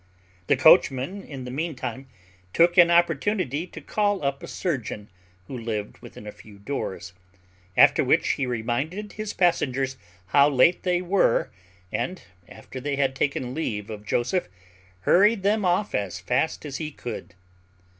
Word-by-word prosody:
The - - +3
coachman, 135 +10 +4
in 135 -3 -8
the 125 - -6
meantime, 135 -2 -4 0.5
took 170 +1 +4
an 175 -2 +7
opportunity 170 - +1
to - - -10
call 205 -4 -1
up 140 0 -1
a - - -8
surgeon, 125 - -4 0.4
who 130 - -8
lived 110 -3 -5
within - - -12
a 105 - -6
few 105 -1 -16
doors; 100 -5 -5 0.6
after - - +6
which, - - +2
he 135 - 0
reminded 130 - -3
his 215 -1 -5
passengers 135 -7 +1 0.3
how 140 +3 +5
late 145 +5 +4
they 180 -1 0
were, 185 -9 +2 0.4
and, 185 +1 -3 0.3
after 130 - -10
they 145 +1 -2
had 135 -1 0
taken 130 -2 -1
leave 110 -9 -3
of 105 -1 -8
Joseph, 125 - 0 0.5
hurried 205 - +4
them 210 +1 +2
off 180 +3 +1
as 100 -3 -2
fast 135 +5 -1
as 140 -2 -5
he 155 -2 -4
could. 120 -9 -8
140 Hz, 150 wpm, -25 LUFS, 125-180 Hz, 0.6 s, an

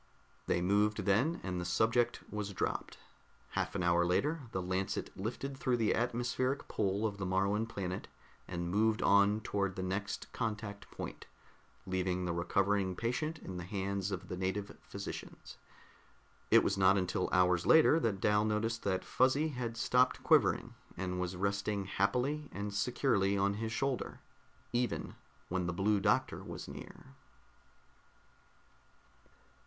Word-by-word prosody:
They 85 - +1
moved 105 +2 +2
then, 125 - +2
and 90 -2 -2
the - - -3
subject 110 +7 +2
was 105 -1 -3
dropped. - - -2 0.5
Half - - -2
an 95 - 0
hour 85 0 +4
later 135 - 0
the 95 - -2
Lancet 95 +1 -2
lifted 120 +7 -4
through 130 -2 0
the 110 -2 +2
atmospheric 120 +3 -1
pull 100 +1 0
of 100 -2 -2
the 95 - -2
Moruan 100 +4 +1
planet 95 -5 -4 0.4
and 85 -1 -3
moved 110 +3 +2
on 100 +2 +4
toward 100 -3 -1
the 95 - -3
next 100 +2 -3
contact 105 -3 -4
point, - - -7 0.6
leaving 90 -1 -1
the 85 - -1
recovering 95 +2 +1
patient 125 - -2
in 95 - -7
the 90 - -4
hands 100 +1 -2
of 95 -1 -5
the - - -4
native 95 +2 -3
physicians. - - -8 0.9
It - - +7
was 100 0 0
not 95 +1 +6
until 90 -1 0
hours 90 -1 +3
later 160 0 +7
that 110 -9 0
Dal 105 +2 +3
noticed 110 +2 0
that 95 -2 -1
Fuzzy 135 +5 +2
had 120 -4 -4
stopped 125 +2 +2
quivering, - - +3 0.2
and 90 0 -2
was 90 0 -2
resting 100 +1 -1
happily 125 +10 0
and 100 +1 -4
securely 100 -3 +1
on 100 +1 +2
his 110 +2 -3
shoulder 135 +1 -2 0.5
even 120 0 -1 0.3
when 90 -1 -1
the 90 - -1
Blue 100 +3 +2
Doctor - - +1
was - - -7
near. - - -10
100 Hz, 145 wpm, -33 LUFS, 95-115 Hz, 0.9 s, It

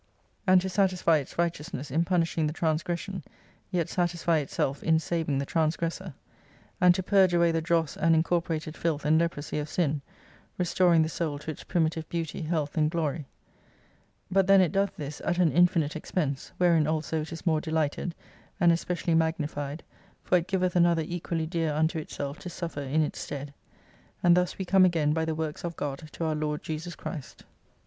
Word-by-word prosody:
and 185 0 +6
to 190 - -3
satisfy 185 -4 +2
its 140 - -6
righteousness 165 -4 -2
in 160 +5 +2
punishing 170 -3 +1
the 150 - -3
trans 160 -1 0
gression, 180 +2 -4 0.5
yet 175 -4 0
satisfy 170 -2 +1
itself 140 -1 -2
in 160 0 +3
saving 160 -2 -1
the 140 - -1
transgressor: 165 +2 -1 0.7
And 180 -1 +6
to 190 - -2
purge 190 -2 +4
away 170 -1 +4
the 165 0 0
dross 165 -2 +1
and 165 0 +3
incorporated 160 -1 0
filth 160 -3 -2
and 155 +2 +4
leprosy 160 -3 -2
of 150 0 -4
sin: 150 -4 0 0.6
restoring 175 -2 +3
the - - -1
Soul 155 -3 -2
to 150 +2 -5
its - - -10
primitive 160 -2 -1
beauty, 165 0 -3
health, 155 -2 -2
and 150 0 +3
glory. 155 -3 -2 1.0
But 190 0 +3
then 195 0 +7
it 180 -4 +3
doth 200 0 0
this 145 -1 -6
at 175 - 0
an 175 -4 +4
infinite 170 -3 +3
expense, 150 -3 -3
wherein 170 -4 +4
also 155 0 -1
it 155 - -7
is 165 - -8
more 160 -3 +2
delighted, 160 +1 -1 0.4
and 175 -3 +5
especially 170 0 -1
magnified, 155 -2 -1 0.4
for - - +2
it 170 - -7
giveth 185 -1 0
Another 170 -2 +4
equally 170 -1 -3
dear 165 -2 -1
unto 160 +2 +1
itself 145 -1 -5
to 180 - -7
suffer 165 -4 -5
in 145 +3 +1
its 150 - -4
stead. 145 0 -6 0.7
And 175 -1 +6
thus 180 0 0
we 190 - -3
come 190 +1 +5
again 160 -5 +3
by 160 0 0
the 160 -1 -2
Works 155 -1 -4
of 170 -1 -4
God 145 +2 -4
to - - -4
our 160 - +1
Lord 150 0 -2
JESUS 160 +2 -5
CHRIST. 150 -7 -8
165 Hz, 185 wpm, -28 LUFS, 155-175 Hz, 1.0 s, then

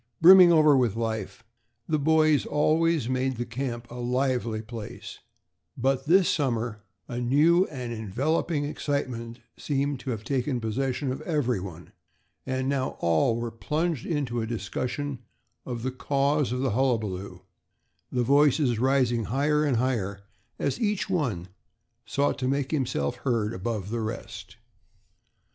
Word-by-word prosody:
Brimming 180 +1 +9
over 155 -3 +6
with 120 -6 +2
life, 110 -3 -3 0.4
the 155 -1 +1
boys 155 0 +3
always 155 -2 +2
made 130 +1 0
the 120 - -2
camp 120 0 -4
a 120 - -7
lively 125 -3 -1
place; 115 -2 -8 0.6
but 135 +2 0
this 185 +2 +5
summer 115 -7 -1 0.3
a 120 - -4
new 155 +9 +4
and 125 -4 -6
enveloping 140 - -1
excitement 130 -5 -3 0.2
seemed 140 -1 -1
to 130 - -6
have 110 -4 -3
taken 130 0 -1
possession 130 +4 -2
of 130 - -5
everyone, 105 - -2 0.6
and 130 0 -1
now 135 -1 -1
all 85 +7 +2
were 120 0 -3
plunged 150 +5 -2
into 135 -7 -1
a 110 - -3
discussion 125 +5 -3 0.5
of 120 -2 -4
the 130 - -1
cause 140 +1 0
of 125 +1 -1
the 135 -2 0
hullabaloo, 110 -6 -1 0.7
the 125 -1 +1
voices 140 -2 +3
rising 125 -3 +2
higher 145 +6 +1
and 140 -5 +1
higher 110 -6 -1 0.4
as 140 - -1
each 210 -2 0
one 120 - -1 0.6
sought 140 0 0
to 130 - -1
make 140 0 -1
himself 125 - -1
heard 115 -4 -1
above 105 0 -4
the 120 -1 -2
rest. 110 +1 -6
130 Hz, 140 wpm, -26 LUFS, 115-145 Hz, 0.7 s, Brimming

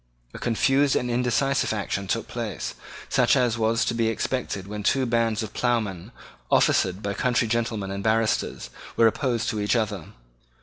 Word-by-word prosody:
A - - -8
confused 135 +4 +2
and 125 0 0
indecisive 125 +3 +1
action 100 -2 -3
took 115 +4 -1
place, 115 -7 -4 0.3
such - - +3
as 120 -3 +2
was 115 +1 +2
to - - 0
be 115 -1 +1
expected 115 -3 -2
when 105 +1 -6
two 130 +6 +2
bands 115 -2 +1
of 110 - -7
ploughmen, 110 -5 -1 0.4
officered 95 +3 +2
by 100 0 -1
country 120 +3 +1
gentlemen 110 -3 -1
and 100 0 -4
barristers, 110 - 0 0.3
were 115 - +5
opposed 120 0 +1
to 110 -4 -2
each 105 +4 +1
other. 105 -7 -1
115 Hz, 165 wpm, -25 LUFS, 105-120 Hz, 0.4 s, were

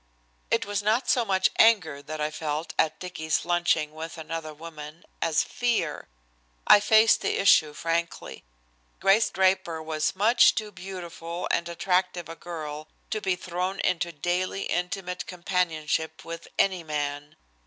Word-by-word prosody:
It - - +1
was 205 0 -2
not 220 +5 +1
so 245 - +3
much 190 -3 +2
anger 180 -11 +4
that 155 +2 -7
I 150 0 -1
felt 155 +1 -4
at 155 - +2
Dicky's 160 -4 -2
lunching 170 -3 +1
with 160 +2 -7
another 160 0 -5
woman 155 0 -10 0.2
as 160 -2 +2
fear. 230 -11 -1 0.6
I - - +8
faced 220 +2 +5
the - - 0
issue 160 -6 +5
frankly. 170 - -3 0.6
Grace 195 +4 +4
Draper 185 -3 +1
was 155 +1 -2
much 225 +5 +5
too 215 -1 -3
beautiful 175 -3 -6
and 170 0 0
attractive 180 -1 0
a 165 - -7
girl 155 -3 -7 0.2
to 215 - -1
be 190 -2 +1
thrown 180 +2 -3
into 175 -1 0
daily 180 +5 -2
intimate 180 0 -3
companionship 170 -3 -2
with 165 0 -7
any 185 -3 +2
man. 145 -1 -4
170 Hz, 145 wpm, -26 LUFS, 155-190 Hz, 0.6 s, I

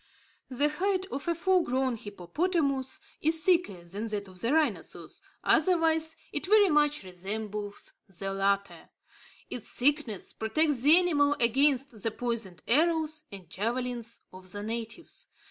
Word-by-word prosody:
The 270 +3 +2
hide 375 +5 0
of 275 +5 -5
a 340 - +1
full 370 +2 +3
grown 260 -3 0
hippopotamus 265 - -2 0.2
is 320 +1 +1
thicker 335 - +2
than 200 +6 -5
that 205 -2 -3
of 185 -1 -11
the 230 - 0
rhinoceros; 205 - -1 0.2
otherwise, 320 -3 +3 0.2
it 295 - -1
very 415 -1 +6
much 295 - +2
resembles 205 +3 -6 0.2
the 195 +1 -4
latter. 200 0 -1 0.6
Its - - -6
thickness 265 - +1
protects 285 +5 +1
the 300 +5 +8
animal 290 -5 +3
against 260 0 +2
the 225 - 0
poisoned 225 -6 -4
arrows 315 +2 +2
and 195 -4 -10
javelins 235 +2 -3
of 185 0 -10
the 205 +2 -5
natives. 230 +7 -6
255 Hz, 135 wpm, -29 LUFS, 205-315 Hz, 0.6 s, the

